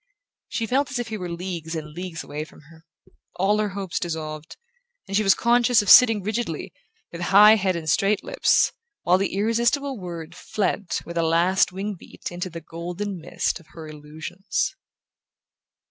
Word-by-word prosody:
She 230 - -2
felt 265 +4 +1
as 255 - -3
if 240 -2 -3
he 220 - -4
were 180 -1 -5
leagues 170 -2 -5
and 150 -1 -6
leagues 175 -1 -6
away 150 +1 -5
from 155 - -15
her. 160 0 -18 0.5
All 205 +3 +2
her 210 -1 0
hopes 195 -3 -4
dissolved, 155 -2 -5 0.5
and 195 - -4
she 215 - +4
was 195 -2 +4
conscious 240 -1 +3
of 200 - +3
sitting 225 -5 +8
rigidly, 215 -5 -3 0.4
with 170 - -7
high 205 +4 +7
head 190 -3 0
and 165 -2 -5
straight 195 +5 +2
lips, - - +2 0.3
while 180 +2 +4
the 195 -1 -1
irresistible 235 +5 +1
word 170 -2 -7
fled 200 +1 -2 0.2
with 170 0 -4
a - - +3
last 170 +4 +3
wing 195 +3 -4
beat - - -9
into 180 +1 -4
the 165 -1 -8
golden 175 +4 -5
mist 160 - -2
of 165 - -20
her 160 -2 -9
illusions... 155 +5 -4
185 Hz, 175 wpm, -24 LUFS, 165-210 Hz, 0.5 s, sitting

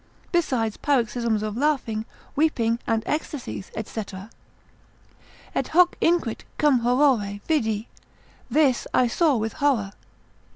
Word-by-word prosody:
besides 255 - 0
paroxysms 235 -5 0
of 215 -1 -3
laughing, 245 -6 0 0.3
weeping 240 -7 +1
and 225 -1 +1
ecstasies, 295 -9 -4 0.2
&c. 220 - -4 1.5
Et - - -1
hoc 355 +1 +5
(inquit) 330 -10 +1
cum 290 -4 +4
horore 240 -5 +2
vidi, 220 -8 0 0.6
this 270 -1 +2
I 255 - +5
saw 295 +5 +2
with 220 -1 -2
horror. 245 -9 +1
245 Hz, 110 wpm, -24 LUFS, 220-295 Hz, 1.5 s, hoc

